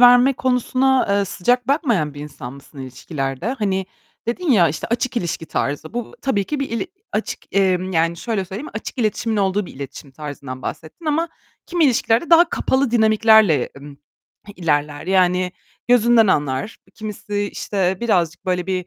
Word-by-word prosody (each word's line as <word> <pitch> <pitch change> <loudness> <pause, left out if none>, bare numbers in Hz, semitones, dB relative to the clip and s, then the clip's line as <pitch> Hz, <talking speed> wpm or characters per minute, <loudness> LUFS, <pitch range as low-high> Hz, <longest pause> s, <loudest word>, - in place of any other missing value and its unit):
verme 245 +2 +7
konusuna, 255 +1 +2
eee, 200 0 +2
sıcak 245 +7 0
bakmayan 230 - +1
bir 145 - -8
insan 135 -4 -8
mısın 140 +1 -15
ilişkilerde? 135 - -5
Hani, 190 -3 0 0.4
dedin 305 +8 -1
ya, 180 -9 +5
işte, 150 - -4
açık 240 +1 -1
ilişki 165 -4 -2
tarzı. 145 +8 -3
Bu 240 -2 -4
tabii 205 -8 +1
ki 295 +4 -3
bir 275 - -2
il 230 +10 -2 0.3
açık, - - -4
emm, 185 -1 +2
yani 165 +1 +1
şöyle 210 -1 -2
söyleyeyim; 205 +11 -7
açık 220 +4 -6
iletişimin 220 0 0
olduğu 195 -1 +1
bir - - -11
iletişim 140 +1 -8
tarzından 140 -3 -7
bahsettin 165 - -7
ama 325 +3 +1 0.4
kimi 345 -2 +2
ilişkilerde 240 +4 +2
daha 335 +1 +7
kapalı 265 -2 +1
dinamiklerle, 220 - +4
emm, 140 0 -11 0.6
ilerler. 150 -2 -1
Yani 185 -1 +2 0.4
gözünden 235 -2 +5
anlar 145 +1 0 0.2
kimisi, 210 -1 -4
işte, 190 -2 -1
birazcık 180 -6 0
böyle 180 0 0
bir, 185 -2 -2
195 Hz, 155 wpm, -21 LUFS, 160-240 Hz, 0.6 s, verme